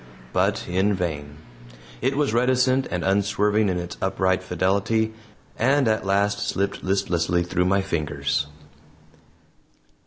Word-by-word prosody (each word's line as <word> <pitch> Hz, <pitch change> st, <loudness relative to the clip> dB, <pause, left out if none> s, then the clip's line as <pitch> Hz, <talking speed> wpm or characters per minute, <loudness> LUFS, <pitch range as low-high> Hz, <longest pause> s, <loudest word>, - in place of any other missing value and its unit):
But -, -, +1 dB
in 95 Hz, +3 st, +1 dB
vain. 75 Hz, -5 st, -4 dB, 0.6 s
It 135 Hz, +1 st, 0 dB
was 145 Hz, -6 st, +1 dB
reticent 130 Hz, +2 st, +2 dB
and 90 Hz, -1 st, -2 dB
unswerving 105 Hz, +2 st, +2 dB
in 90 Hz, -, -1 dB
its 85 Hz, 0 st, -5 dB
upright 95 Hz, -1 st, +1 dB
fidelity, 100 Hz, +5 st, 0 dB, 0.5 s
and 135 Hz, +2 st, +3 dB
at 110 Hz, -3 st, 0 dB
last 100 Hz, +1 st, +1 dB
slipped 100 Hz, 0 st, -2 dB
listlessly 85 Hz, -3 st, +1 dB
through 90 Hz, +1 st, 0 dB
my 95 Hz, +1 st, +2 dB
fingers. 75 Hz, -5 st, -1 dB
95 Hz, 120 wpm, -24 LUFS, 90-110 Hz, 0.6 s, and